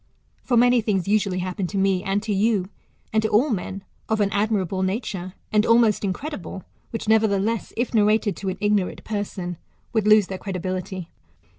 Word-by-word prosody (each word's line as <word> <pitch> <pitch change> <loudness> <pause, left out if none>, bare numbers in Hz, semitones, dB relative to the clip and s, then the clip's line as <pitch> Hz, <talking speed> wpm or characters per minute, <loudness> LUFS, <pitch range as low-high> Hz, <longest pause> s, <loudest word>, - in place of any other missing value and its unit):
For 245 - +1
many 245 0 +5
things 195 -4 0
usually 200 -3 +1
happen 185 +1 -2
to 200 - -4
me 195 -1 +2
and 200 +1 0
to 215 -2 -1
you, 200 -2 +1 0.4
and 220 - +3
to 220 - 0
all 250 +7 +3
men, 195 -1 -3 0.3
of 220 -1 +1
an 200 -1 +2
admirable 200 -3 0
nature, 190 -2 -3 0.2
and 210 0 +4
almost 230 -2 +4
in 195 - +1
credible 195 - -6
} - - -39
which, 225 - -5
nevertheless, 220 0 +2
if 240 +1 -1
narrated 210 -1 +3
to 195 - -3
an 185 - -4
ignorant 205 -2 0
person, 195 -4 -4 0.4
would 220 -2 +1
lose 215 -1 +6
their 190 0 -6
credibility. 185 -1 -4
205 Hz, 180 wpm, -23 LUFS, 190-220 Hz, 0.4 s, lose